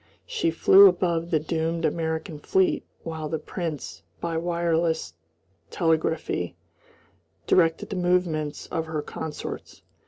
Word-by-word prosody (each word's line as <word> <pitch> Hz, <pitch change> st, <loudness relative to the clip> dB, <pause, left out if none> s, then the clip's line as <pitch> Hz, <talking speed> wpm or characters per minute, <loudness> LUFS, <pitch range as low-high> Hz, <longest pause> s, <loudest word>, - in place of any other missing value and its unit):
She 485 Hz, -, 0 dB
flew 190 Hz, +4 st, +8 dB
above 175 Hz, -2 st, +1 dB
the 160 Hz, -, +2 dB
doomed 165 Hz, +2 st, -1 dB
American 160 Hz, -2 st, -2 dB
fleet 190 Hz, +5 st, +2 dB, 0.2 s
while 160 Hz, -2 st, -4 dB
the 160 Hz, -, -1 dB
Prince 150 Hz, -, -5 dB, 0.2 s
by 170 Hz, -1 st, -3 dB
wireless 170 Hz, -, 0 dB, 0.6 s
telegraphy 160 Hz, -, 0 dB, 0.9 s
directed 165 Hz, 0 st, +2 dB
the -, -, -2 dB
movements 175 Hz, -4 st, 0 dB
of 165 Hz, 0 st, -2 dB
her 155 Hz, -2 st, -3 dB
consorts. 155 Hz, -2 st, -7 dB
165 Hz, 115 wpm, -25 LUFS, 160-170 Hz, 0.9 s, flew